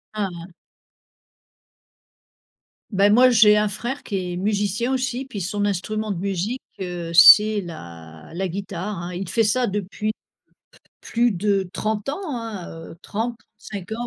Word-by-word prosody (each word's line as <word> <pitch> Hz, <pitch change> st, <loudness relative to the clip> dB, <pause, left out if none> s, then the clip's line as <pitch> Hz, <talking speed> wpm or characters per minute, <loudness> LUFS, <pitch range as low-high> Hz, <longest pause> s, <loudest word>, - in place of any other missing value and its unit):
Ah 205 Hz, -2 st, 0 dB
hein. 170 Hz, +1 st, -10 dB, 2.4 s
Beh 200 Hz, +1 st, +4 dB
moi 250 Hz, +4 st, +6 dB
j'ai 210 Hz, -2 st, +6 dB
un 210 Hz, 0 st, +2 dB
frère 240 Hz, +7 st, -5 dB
qui 185 Hz, -4 st, -3 dB
est 175 Hz, -, -4 dB
musicien 210 Hz, +5 st, 0 dB
aussi 255 Hz, 0 st, -2 dB
puis 215 Hz, -7 st, -6 dB
son 205 Hz, +3 st, -2 dB
instrument 215 Hz, +3 st, -2 dB
de 185 Hz, -, -3 dB
musique, 200 Hz, +6 st, -2 dB, 0.2 s
heu, 175 Hz, -2 st, -5 dB
c'est 210 Hz, +5 st, +8 dB
la 85 Hz, -, -11 dB
la 190 Hz, +1 st, -1 dB
guitare, 195 Hz, +2 st, -5 dB
hein. 175 Hz, +1 st, -6 dB
Il 190 Hz, 0 st, -4 dB
fait 225 Hz, -, +2 dB
ça 245 Hz, +4 st, +2 dB
depuis 205 Hz, +2 st, -3 dB
p -, -, -24 dB, 0.7 s
plus 235 Hz, -1 st, +1 dB
de 195 Hz, 0 st, 0 dB
30 215 Hz, 0 st, -2 dB
ans 295 Hz, +8 st, -3 dB, 0.2 s
hein, 220 Hz, -6 st, -6 dB, 0.2 s
heu, -, -, -14 dB
35 215 Hz, -3 st, -6 dB
ans 240 Hz, +2 st, -3 dB
205 Hz, 150 wpm, -22 LUFS, 180-220 Hz, 2.4 s, c'est